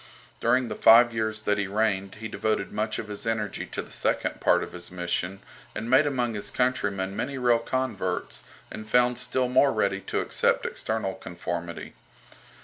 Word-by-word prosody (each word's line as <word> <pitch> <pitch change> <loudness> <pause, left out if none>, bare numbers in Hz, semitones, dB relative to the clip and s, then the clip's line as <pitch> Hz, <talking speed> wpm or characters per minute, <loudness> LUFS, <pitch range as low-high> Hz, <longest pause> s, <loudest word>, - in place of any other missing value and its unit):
During 125 -1 +2
the - - -4
five 120 +1 +7
years 110 -1 -2
that 105 -1 +1
he 100 - 0
reigned 100 -2 0
he 110 +1 -6
devoted 110 -2 -1
much 110 0 -1
of 105 - -5
his 105 +2 -6
energy 110 -2 -2
to - - -4
the - - -14
second - - -1
part - - +4
of - - -7
his 90 0 -9
mission, 90 +2 -3 0.3
and 115 +3 -4
made 140 +3 +6
among 125 -4 0
his 105 - -4
countrymen 100 -7 0
many 135 +5 -3
real 120 -2 +3
converts, 115 -7 -2 0.3
and 110 0 -8
found 125 +1 +3
still 130 -1 0
more 130 +2 +4
ready 100 -2 0
to - - -2
accept - - +1
external 110 -3 -2
conformity. 85 -1 -6
110 Hz, 175 wpm, -26 LUFS, 100-120 Hz, 0.3 s, five